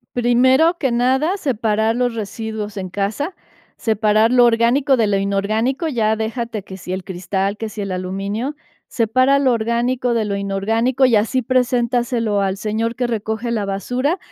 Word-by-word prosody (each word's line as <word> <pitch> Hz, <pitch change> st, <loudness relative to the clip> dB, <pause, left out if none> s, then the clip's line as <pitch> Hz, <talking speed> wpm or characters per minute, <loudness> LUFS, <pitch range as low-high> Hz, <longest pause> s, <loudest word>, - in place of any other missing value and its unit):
Primero 260 Hz, +7 st, +3 dB
que 265 Hz, -7 st, 0 dB
nada, 265 Hz, +9 st, +2 dB
separar 225 Hz, -, 0 dB
los 245 Hz, -2 st, 0 dB
residuos 215 Hz, -1 st, -5 dB
en 185 Hz, -1 st, -4 dB
casa. 205 Hz, -, -3 dB, 0.4 s
Separar 215 Hz, 0 st, +2 dB
lo 245 Hz, -1 st, +6 dB
orgánico, 240 Hz, +4 st, +3 dB
de 225 Hz, -3 st, +2 dB
lo 200 Hz, -1 st, +1 dB
inorgánico, 215 Hz, -, 0 dB
ya 220 Hz, -5 st, +1 dB
déjate 225 Hz, -1 st, -4 dB
que 190 Hz, -, -10 dB
si 185 Hz, 0 st, -6 dB
el 190 Hz, -1 st, -4 dB
cristal, 190 Hz, +2 st, -2 dB
que 225 Hz, -, -4 dB
si 210 Hz, 0 st, -7 dB
el 195 Hz, -1 st, -4 dB
aluminio. 200 Hz, +9 st, -3 dB, 0.3 s
Separa 255 Hz, +4 st, +2 dB
lo 265 Hz, -2 st, +3 dB
orgánico, 240 Hz, +2 st, 0 dB
de 230 Hz, -2 st, +1 dB
lo 200 Hz, -1 st, -2 dB
inorgánico 225 Hz, +7 st, 0 dB
y 235 Hz, -4 st, +4 dB
así 240 Hz, +5 st, +1 dB
preséntaselo 240 Hz, -3 st, 0 dB
al 195 Hz, -1 st, 0 dB
señor 225 Hz, +3 st, -2 dB
que 250 Hz, -1 st, -1 dB
recoge 220 Hz, +1 st, -3 dB
la 215 Hz, -3 st, -1 dB
basura, 250 Hz, -, -1 dB
230 Hz, 165 wpm, -19 LUFS, 205-250 Hz, 0.4 s, lo